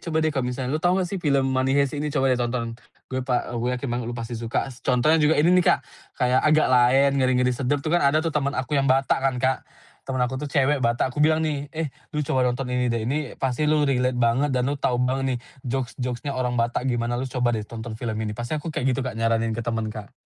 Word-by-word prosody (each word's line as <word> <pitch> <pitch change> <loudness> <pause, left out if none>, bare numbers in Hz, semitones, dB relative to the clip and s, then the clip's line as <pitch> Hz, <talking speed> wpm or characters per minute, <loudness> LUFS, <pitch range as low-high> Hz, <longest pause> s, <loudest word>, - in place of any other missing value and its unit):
coba 160 -2 -1
deh 155 - +1
kalo 135 - 0
misalnya 125 +1 -3
lu 155 - -1
tau 180 +1 +3
gak 185 - +1
sih 190 +1 -4
film 140 -3 +2
Money 130 0 +1
Heist 140 -2 +2
ini? 150 +1 -2
Coba 135 -2 +2
deh 125 - 0
tonton, 120 -1 -2 0.4
gue 130 - 0
pa 125 -1 0
eee, - - -6
gue 120 - -1
yakin 140 - -5
banget 120 -1 -2
lu 120 - -5
pasti 115 0 -5
suka," 115 0 -2 0.2
contohnya 135 +5 +3
juga 150 +2 +4
ini 165 +4 +4
nih 180 - +5
Kak, - - +5 0.4
kayak 125 +1 +3
Agak 155 0 +4
Laen, 130 +3 +5
Ngeri-Ngeri 125 -1 +2
Sedap 140 +3 0
tuh 155 - -1
kan 175 - +4
ada 140 +2 +4
tuh 165 - -1
temen 140 -2 +1
aku 130 +3 -2
yang 135 -1 +2
Batak 135 +1 +3
kan 135 -1 +2
Kak, 130 +1 +1 0.5
temen 130 - -2
aku 125 +1 -3
tuh 150 - -4
cewek 140 0 +2
Batak 120 +2 +1
aku 150 - -2
bilang 155 +1 +4
nih, 145 -2 -2
"Eh, 160 +1 -3 0.3
lu 150 - 0
coba 130 - +1
nonton 125 +2 -2
ini 125 0 +1
deh 115 -1 -1
ini 145 +2 -2
pasti 135 +3 0
lu 155 -1 +3
relate 125 -2 +1
banget 120 +4 +2
dan 125 -1 +1
lu 140 - 0
tau 125 - +1
banget 130 +1 0
nih - - -6 0.2
jokes-jokes-nya 125 +1 -3
orang 125 -1 -1
Batak 120 +2 0
gimana 120 0 -1
lu 130 - -3
coba 125 -1 +1
deh 110 - -2
tonton 115 0 -7
film 110 -1 -4
ini," 110 -1 -2
pasti 120 +7 -3
aku 150 - -9
kayak 130 -3 0
gitu - - -1
Kak 130 - -4
nyaranin 115 0 +1
ke 115 - -3
temen 115 -1 -2
Kak. 105 -1 -9
130 Hz, 260 wpm, -24 LUFS, 120-145 Hz, 0.5 s, nih